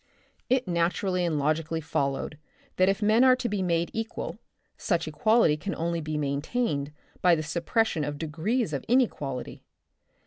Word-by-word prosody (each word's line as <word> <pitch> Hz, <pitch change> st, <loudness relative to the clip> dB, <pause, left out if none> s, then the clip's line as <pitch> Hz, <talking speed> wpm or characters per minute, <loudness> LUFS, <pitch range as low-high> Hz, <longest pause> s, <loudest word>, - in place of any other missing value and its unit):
It 255 Hz, -3 st, +2 dB
naturally 180 Hz, +2 st, 0 dB
and 165 Hz, -3 st, 0 dB
logically 155 Hz, +3 st, 0 dB
followed 145 Hz, -1 st, -2 dB, 0.4 s
that 185 Hz, +1 st, +4 dB
if 195 Hz, +2 st, 0 dB
men 220 Hz, +4 st, +5 dB
are 255 Hz, -1 st, +7 dB
to 250 Hz, -1 st, -3 dB
be 205 Hz, -3 st, -1 dB
made 170 Hz, -2 st, 0 dB
equal, 225 Hz, +1 st, -4 dB, 0.4 s
such -, -, -1 dB
equality 220 Hz, -9 st, +3 dB
can 200 Hz, +6 st, -4 dB
only 170 Hz, 0 st, -1 dB
be 155 Hz, 0 st, -3 dB
maintained 145 Hz, -, -1 dB, 0.3 s
by 180 Hz, -2 st, +5 dB
the 155 Hz, -, -3 dB
suppression 170 Hz, +3 st, 0 dB
of 145 Hz, 0 st, -3 dB
degrees 165 Hz, -, -1 dB
of 140 Hz, -, -2 dB
inequality. 150 Hz, -, 0 dB
170 Hz, 150 wpm, -27 LUFS, 150-220 Hz, 0.4 s, are